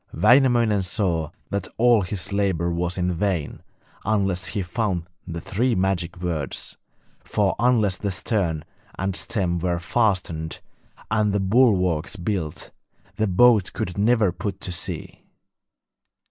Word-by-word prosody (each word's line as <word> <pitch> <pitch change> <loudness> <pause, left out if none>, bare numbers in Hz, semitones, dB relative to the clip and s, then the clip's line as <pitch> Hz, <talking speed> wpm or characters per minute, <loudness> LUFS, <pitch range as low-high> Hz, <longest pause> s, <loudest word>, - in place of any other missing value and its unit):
Wainamoinen 120 -3 +4
saw 90 -5 0 0.2
that 100 -2 -2
all 120 -2 +5
his 95 +1 -3
labour 95 -4 +1
was 85 +1 -1
in 90 0 0
vain 85 -4 -2 0.4
unless 95 -3 0
he 100 +2 -2
found 90 -2 -2 0.2
the 85 0 -4
three 110 +8 0
magic 95 -3 -1
words, 85 -5 -3 0.4
for - - 0
unless 110 -5 +3
the 100 - -2
stern 90 -5 -1 0.3
and 95 0 -1
stem 90 -6 -1
were 85 0 0
fastened 90 -5 0 0.5
and 105 -2 +2
the 100 - +1
bulwarks 95 -5 +2
built, 90 -4 -3 0.5
the 110 - +1
boat 105 +1 +4
could 90 - -3
never 105 -1 +3
put 95 +2 -5
to 90 - -4
sea. 85 - -4
95 Hz, 130 wpm, -23 LUFS, 85-105 Hz, 0.5 s, all